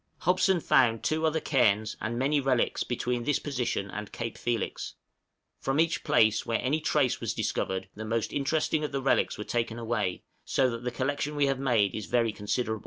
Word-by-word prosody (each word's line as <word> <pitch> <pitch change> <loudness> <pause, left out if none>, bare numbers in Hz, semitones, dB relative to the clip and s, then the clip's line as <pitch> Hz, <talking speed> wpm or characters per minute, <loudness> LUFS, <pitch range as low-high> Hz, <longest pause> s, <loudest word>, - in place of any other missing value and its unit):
Hobson 185 0 +3
found 115 -6 +3
two 160 +1 +1
other 160 +1 +1
cairns, 110 -8 +2
and 120 +2 -2
many 140 +4 +2
relics, 130 -3 +1
between 120 0 -2
this 145 +3 +2
position 125 -8 -2
and 105 -1 -6
Cape 115 -1 -5
Felix. 115 -4 -3 0.6
From 135 +2 0
each 165 0 +1
place 110 0 +3
where 115 -1 -1
any 150 +5 0
trace - - +1
was - - -2
discovered 95 0 -2
the 110 - -7
most 115 0 -2
interesting 150 +2 0
of 150 - -2
the 135 -1 -2
relics 135 - +2
were 105 - -4
taken 115 0 -2
away, 110 -5 -2 0.2
so 130 -2 +1
that 115 +1 -6
the 125 - -1
collection 145 +4 -2
we 145 -1 +3
have 135 -1 0
made 115 -8 +2
is 105 - -5
very 115 -2 +2
considerable. 110 +2 -2
120 Hz, 190 wpm, -28 LUFS, 110-140 Hz, 0.6 s, Hobson